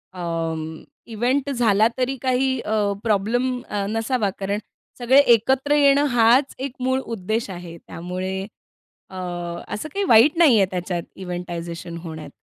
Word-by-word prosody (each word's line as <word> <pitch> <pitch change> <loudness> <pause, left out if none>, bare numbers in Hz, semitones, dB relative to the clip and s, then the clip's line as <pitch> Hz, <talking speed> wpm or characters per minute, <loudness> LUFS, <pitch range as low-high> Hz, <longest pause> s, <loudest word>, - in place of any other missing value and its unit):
अं, 165 -2 -4 0.3
event 255 +5 0
झाला 225 -4 +3
तरी 260 +1 0
काही 260 0 +1
अ, 220 - -2 0.3
प्रॉब्लम 240 +4 0
अ, 200 -1 -2
नसावा, 225 -1 0
कारण 200 +2 -2 0.4
सगळे 255 +3 +5
एकत्र 265 +6 +2
येणं 285 0 +4
हाच 240 +4 +4
एक 270 -1 -3
मूळ 260 +1 +1
उद्देश 220 0 -3
आहे. 175 -2 -8
त्यामुळे 185 +3 -5 0.7
अ, 190 - -12 0.6
असं 310 +9 -5
काही 400 0 -1
वाईट 240 +8 +6
नाही 290 -10 +6
आहे 195 - +5
त्याच्यात, 180 -1 -3
इव्हेंटायझेशन 175 -2 -6
होण्यात. 155 -3 -7
220 Hz, 135 wpm, -22 LUFS, 180-260 Hz, 0.7 s, वाईट